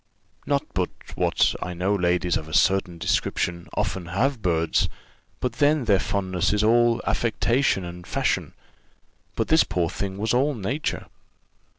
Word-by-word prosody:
Not - - +1
but - - 0 0.2
what - - +2
I 90 -1 -4
know 95 +4 0
ladies 90 -2 +1
of 80 - -3
a - - -3
certain 95 -4 +2
description 85 +1 -1
often 90 -3 -2
have 115 +8 0
birds, 85 -3 +1 0.5
but 125 -2 -2
then 145 -2 +3
their 100 -4 +4
fondness 95 -1 0
is 105 0 +1
all 120 +1 +3
affectation 115 -3 +1
and 85 0 -9
fashion; - - -1 0.8
but - - -1
this 160 +1 +6
poor 85 -1 -1
thing 95 -1 -4
was 110 +3 0
all 140 +4 +2
nature. 120 +8 -3
95 Hz, 150 wpm, -24 LUFS, 90-120 Hz, 0.8 s, this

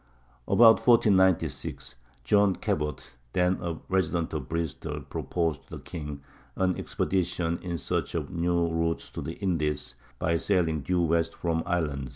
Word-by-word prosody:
About 115 -1 +7
1496 95 -6 +3 0.3
John 100 +8 +4
Cabot, 75 0 -3 0.2
then 90 +1 +2
a 85 -2 -3
resident 85 -3 0
of 70 -5 -4
Bristol, 80 -4 -3
proposed 80 -4 -2
to - - -8
the - - -8
king 75 -3 -6 0.3
an 90 -1 +1
expedition 90 -2 -1
in 85 -2 -3
search - - -2
of - - -2
a - - -11
new 85 0 +1
route 80 0 -1
to - - -4
the - - -5
Indies 80 -9 -2 0.2
by 85 +5 +1
sailing 80 -4 +1
due 90 +4 +1
west 85 0 +1
from 85 -1 -1
Ireland. 75 -7 -1
85 Hz, 150 wpm, -28 LUFS, 80-90 Hz, 0.3 s, About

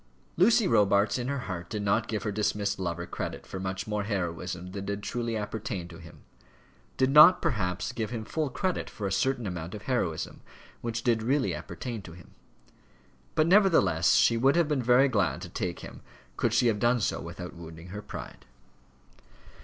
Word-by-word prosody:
Lucy 225 +3 +4
Robarts 100 - +3
in 120 - -3
her 140 -1 -2
heart 85 -3 -5
did 105 -2 -3
not 100 +3 +1
give 110 -3 -3
her 105 - -1
dismissed 100 -1 -1
lover 85 -1 -3
credit - - -5
for 95 - -7
much 95 0 -3
more 105 -1 -2
heroism 90 -2 -3
than 100 0 -5
did 100 +1 -4
truly 115 -1 -2
appertain 105 -3 -4
to 85 -1 -12
him; - - -14 0.8
did 130 0 +2
not, 155 +5 +9
perhaps, 95 - -1
give 110 -2 -3
him 115 -3 -5
full 155 +4 -2
credit 185 +6 -2
for 105 - -6
a 95 - -1
certain 120 +5 0
amount 90 -1 -5
of 105 - -9
heroism 120 -12 -2 0.4
which 115 0 -3
did 115 -3 +2
really 130 +4 +1
appertain 120 -4 -6
to 85 -3 -11
him; 85 -1 -15 1.0
but, 155 - +4
nevertheless, 160 - +4
she 115 - +4
would 135 +5 +3
have 170 -2 +3
been 150 -3 0
very 125 +3 +5
glad 100 -9 0
to 90 0 -8
take 90 0 -4
him - - -10 0.3
could 120 - 0
she 120 +2 +3
have 110 -3 +2
done 120 +3 +3
so - - -1
without 90 +1 -7
wounding 85 0 -11
her 105 +3 -6
pride. 65 - -9
105 Hz, 185 wpm, -28 LUFS, 90-125 Hz, 1.0 s, not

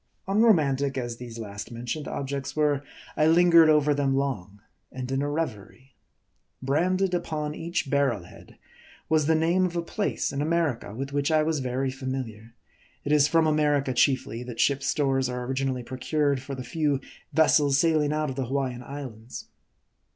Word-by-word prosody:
Unromantic 155 - +3
as 120 -2 -3
these 120 -2 -9
last 105 -2 -7
mentioned 120 +5 -5
objects 140 0 -4
were, 150 -2 +2 0.3
I 155 - +3
lingered 170 -1 +6
over 150 -1 +4
them 140 -1 +1
long, 105 -8 -3 0.3
and 130 0 -6
in 135 +1 0
a 145 - -1
revery. 130 -3 -5 0.7
Branded 180 +8 +1
upon 155 -4 -2
each 170 0 -3
barrel 135 -8 +1
head 90 - -16 0.5
was 155 -1 +2
the 160 - +4
name 170 +4 +2
of 180 -1 -1
a 170 - -1
place 200 -1 -2
in 140 - -2
America, 150 -10 -1
with 135 +3 -5
which 145 +1 0
I 155 -1 +3
was 155 -1 0
very 130 +1 -1
familiar. 130 -4 -6 0.5
It 145 - -3
is 150 -1 +5
from 165 +1 +3
America 150 -3 +2
chiefly, 130 -2 +1
that 120 -2 -8
ship's 140 +1 +2
stores 135 -3 +1
are 125 0 -4
originally 130 -1 -2
pro 130 +2 -8
cured 145 -1 0
for 135 +1 -6
the 130 - -6
few 145 +2 0 0.3
vessels 145 -2 +4
sailing 155 -1 +2
out 155 -2 -1
of - - -7
the 135 -1 -2
Hawaiian 130 -2 -2
Islands. 125 -4 -8
140 Hz, 170 wpm, -26 LUFS, 130-155 Hz, 0.7 s, lingered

